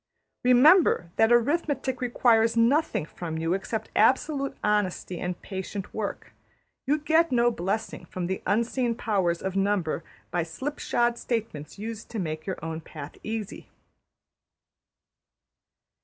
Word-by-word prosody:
'' - - -55
Remember 250 - +5
that 225 +1 +4
arithmetic 265 +1 +1
requires 230 -2 +3
nothing 245 - +2
from 165 0 -6
you 165 +2 0
except 195 +3 -3
absolute 275 +5 +2
honesty 205 -4 0
and 180 0 -3
patient 190 0 -6
work. 215 -2 -5 0.5
You 295 +3 +3
get 320 +1 +2
no 240 -1 +4
blessing 210 +2 -3
from 180 -1 -4
the 190 +2 -3
Unseen 235 +2 +1
Powers 190 -7 0
of 190 0 -3
Number 195 -5 0 0.3
by 175 - +1
slipshod 240 - -1
statements 215 - -4
used 220 +1 -6
to 230 - -6
make 155 -4 -4
your 190 - -2
own 160 0 -4
path 150 -2 -9
easy. 220 -2 -5
220 Hz, 125 wpm, -27 LUFS, 180-245 Hz, 0.5 s, Remember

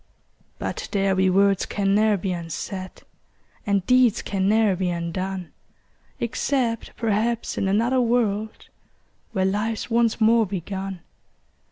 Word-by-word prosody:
But - - -4
there 195 -1 +2
be 190 0 +3
words 195 +1 +3
can 195 -1 0
ne'er 210 0 +3
be 190 0 -3
unsaid, 180 +2 -6 0.6
And 200 -2 +1
deeds 250 -2 +4
can 195 -1 0
ne'er 215 -2 +3
be 180 0 -1
undone, 175 +1 -4 0.7
Except 235 0 -1
perhaps 230 +1 0
in 195 - -1
another 235 +6 +2
world, 220 -3 -1 0.6
Where 190 -1 +1
life's 210 +4 -1
once 230 -1 +2
more 225 0 +4
begun. 190 0 -5
200 Hz, 125 wpm, -24 LUFS, 190-225 Hz, 0.7 s, deeds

